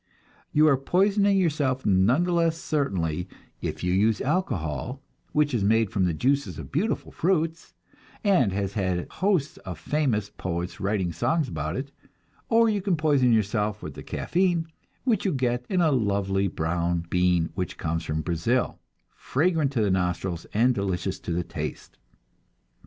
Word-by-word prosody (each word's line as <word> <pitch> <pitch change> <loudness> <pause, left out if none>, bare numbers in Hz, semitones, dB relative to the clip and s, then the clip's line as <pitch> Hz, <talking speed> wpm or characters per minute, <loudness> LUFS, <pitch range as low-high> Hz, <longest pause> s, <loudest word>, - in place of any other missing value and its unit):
You 155 +1 +5
are 140 -3 +5
poisoning 200 +7 +3
yourself 145 -7 +1
none 105 - +4
the 180 - -1
less 165 -1 +2
certainly 90 - -1 0.3
if - - -4
you 90 0 +1
use 105 +3 +3
alcohol, 125 - -2 0.3
which 150 -1 +2
is 115 -5 +1
made 110 0 +3
from 95 -2 +1
the 90 - +1
juices 140 - 0
of - - -8
beautiful 185 +11 -1
fruits, 165 -2 -1 0.5
and 180 - +3
has 100 0 -2
had 95 -4 -1
hosts 185 -6 0
of 90 -4 -7
famous 110 - 0
poets 90 +1 -4
writing 95 -3 -1
songs 155 - 0
about 80 -1 -3
it; 135 +4 -4 0.6
or 230 0 +5
you 210 -2 +1
can 185 -3 +1
poison 145 -5 +3
yourself 105 -1 0
with 75 - -6
the - - -9
caffein 175 -2 0 0.4
which 230 -6 +1
you 195 - +1
get 125 -2 -1
in 185 -2 +2
a 160 -3 +4
lovely 100 -5 +1
brown 85 0 -1
bean 90 -2 +2
which 95 -2 -4
comes 80 0 -2
from 80 0 -2
Brazil, 85 +10 0 0.3
fragrant 155 -1 +1
to 115 -5 +1
the 100 - +2
nostrils 90 -1 -1
and 120 +4 +3
delicious 95 -2 -2
to - - -5
the 85 +1 0
taste. - - -6
115 Hz, 160 wpm, -26 LUFS, -, 0.6 s, You